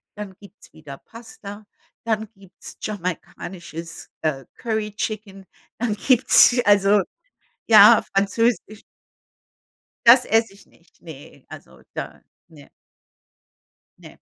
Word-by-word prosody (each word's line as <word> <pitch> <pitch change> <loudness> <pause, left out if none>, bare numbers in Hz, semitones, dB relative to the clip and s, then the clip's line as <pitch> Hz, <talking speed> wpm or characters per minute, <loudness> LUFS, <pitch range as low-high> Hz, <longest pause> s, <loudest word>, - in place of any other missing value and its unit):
dann 205 -3 -9
gibt's 200 0 -18
wieder 150 -3 -12
Pasta, 215 -3 -12 0.4
dann 220 -2 -2
gibt's 195 -2 -14
jamaikanisches, 175 -3 -7
äh, 140 -5 -3
Curry 220 -3 -4
Chicken, 200 -3 -6 0.3
dann 225 -3 -1
gibt's 250 +1 +4
also, 205 0 +4 0.7
ja, 220 0 +7
Französisch. 215 +2 -1 1.2
Das 245 +1 +7
esse 225 -2 +1
ich 200 - -20
nicht. 170 -1 -29
Ne. 155 -4 -14
Also - - -14
da - - -7 0.3
ne. 155 -4 -18 1.3
Ne. - - -15
205 Hz, 100 wpm, -21 LUFS, 180-220 Hz, 1.3 s, ja